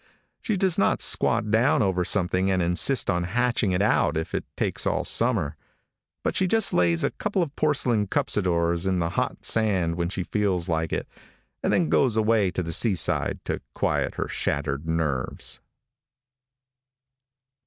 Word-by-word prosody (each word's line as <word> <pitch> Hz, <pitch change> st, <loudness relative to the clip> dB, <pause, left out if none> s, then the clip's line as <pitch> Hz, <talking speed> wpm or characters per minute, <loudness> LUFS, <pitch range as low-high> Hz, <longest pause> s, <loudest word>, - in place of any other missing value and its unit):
She 215 Hz, -4 st, -1 dB
does 185 Hz, -2 st, +1 dB
not -, -, +2 dB
squat 105 Hz, -, +2 dB
down 115 Hz, +2 st, +3 dB
over 95 Hz, -2 st, 0 dB
something 95 Hz, 0 st, +1 dB
and 95 Hz, -1 st, +1 dB
insist 90 Hz, +10 st, +2 dB
on 90 Hz, -3 st, 0 dB
hatching 120 Hz, +1 st, 0 dB
it 90 Hz, +2 st, +1 dB
out 85 Hz, -5 st, +2 dB
if 80 Hz, -, -4 dB
it -, -, -2 dB
takes -, -, 0 dB
all -, -, -1 dB
summer, 115 Hz, -, +1 dB, 0.7 s
but -, -, -1 dB
she 190 Hz, -, +1 dB
just 225 Hz, +2 st, +2 dB
lays 85 Hz, -2 st, +2 dB
a -, -, +1 dB
couple 205 Hz, -3 st, -1 dB
of 150 Hz, -3 st, -7 dB
porcelain 125 Hz, -8 st, +1 dB
cuspidors 85 Hz, -3 st, 0 dB
in 95 Hz, -1 st, +1 dB
the 85 Hz, -1 st, -1 dB
hot -, -, -3 dB
sand 95 Hz, -7 st, +1 dB
when 85 Hz, 0 st, -2 dB
she 90 Hz, -1 st, -3 dB
feels 95 Hz, -4 st, -1 dB
like 80 Hz, -1 st, -1 dB
it, -, -, -3 dB, 0.5 s
and -, -, 0 dB
then 175 Hz, -, +2 dB
goes 125 Hz, -7 st, +2 dB
away 110 Hz, -3 st, +2 dB
to 90 Hz, 0 st, -3 dB
the 85 Hz, 0 st, -2 dB
seaside 95 Hz, -4 st, +1 dB
to -, -, -3 dB
quiet -, -, -1 dB
her -, -, -3 dB
shattered 70 Hz, +1 st, -3 dB
nerves. 80 Hz, -6 st, -3 dB
95 Hz, 165 wpm, -25 LUFS, 85-115 Hz, 0.7 s, down